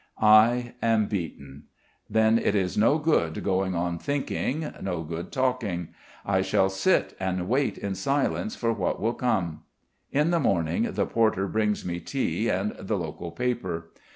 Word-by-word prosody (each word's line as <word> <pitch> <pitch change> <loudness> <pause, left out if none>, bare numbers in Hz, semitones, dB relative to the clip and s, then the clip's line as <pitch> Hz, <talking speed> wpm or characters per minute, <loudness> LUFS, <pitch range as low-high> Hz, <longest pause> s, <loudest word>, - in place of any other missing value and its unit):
I 115 +3 +5
am 115 -2 +3
beaten. 75 -8 -5 0.4
Then 110 +1 +4
it's 95 -5 0
no 115 +8 +4
good 145 - +1
going 95 -1 0
on 85 0 -1
thinking, 145 - -2
no 90 -4 -2
good 80 +2 -6
talking. 125 - -1 0.4
I 95 -1 +2
shall 95 0 +2
sit 180 - +1
and 95 -1 -2
wait 135 +5 +1
in 100 -1 -3
silence 140 - -1
for 115 -1 0
what 100 -5 -1
will 115 +3 0
come. 90 -11 -1 0.5
In 150 +4 +2
the 170 - +2
morning 85 - +1
the - - +1
porter 110 -4 +1
brings 105 0 0
me 85 -1 -3
tea 85 - -1
and - - 0
the - - -2
local 85 - -5
paper. 95 -5 -3
100 Hz, 155 wpm, -26 LUFS, 90-120 Hz, 0.5 s, I